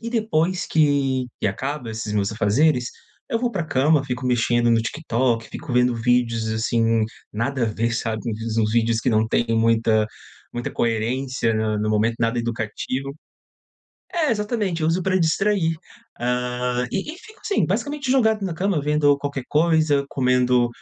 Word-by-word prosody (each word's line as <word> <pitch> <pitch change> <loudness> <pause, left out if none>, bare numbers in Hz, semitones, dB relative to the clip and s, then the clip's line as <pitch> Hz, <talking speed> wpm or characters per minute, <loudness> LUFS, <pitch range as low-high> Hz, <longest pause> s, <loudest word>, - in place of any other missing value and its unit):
E 230 - -5
depois 185 -6 0
que 140 -4 +2
que - - +1
acaba 130 +4 -3
esses 110 -1 -4
meus 100 0 0
afazeres, 125 +5 +2 0.4
eu 230 - +1
vou 240 0 0
pra 185 -7 -2
cama, 145 +1 +2
fico 125 -1 -4
mexendo 120 -1 +2
no 115 -1 +3
TikTok, 120 -4 -1
fico 150 -5 -7
vendo 125 0 +3
vídeos, 115 -1 +1
assim, 115 0 +1 0.3
nada 125 +5 -2
a - - +3
ver, 115 +2 -1
sabe, 110 -2 -2
um 110 - -1
vi 115 0 -2
uns 105 0 0
vídeos 115 0 +2
que - - -1
não 110 -1 +2
têm 120 +1 +1
muita 115 -1 +3 0.5
muita 120 0 -4
coerência, 115 +1 -1
na 110 -1 0
no 105 0 -1
momento, 110 +2 +1
nada 115 +1 +1
educativo 120 +4 -3 1.0
É, 325 -5 +1
exatamente, 210 -5 -1
eu - - +2
uso 175 +2 +1
pra 190 +1 +1
distrair. 165 0 +1 0.4
Hã, 125 0 -1
e 200 +10 -3
e - - -13
fico 435 +4 -16
assim, 410 - +1
basicamente 285 -2 -2
jogado 220 -5 +3
na 170 - -4
cama 185 -2 0
vendo 145 0 +3
qualquer 140 -1 -4
coisa, 155 -2 +2
comendo 125 -2 +2
125 Hz, 165 wpm, -22 LUFS, 115-160 Hz, 1.0 s, no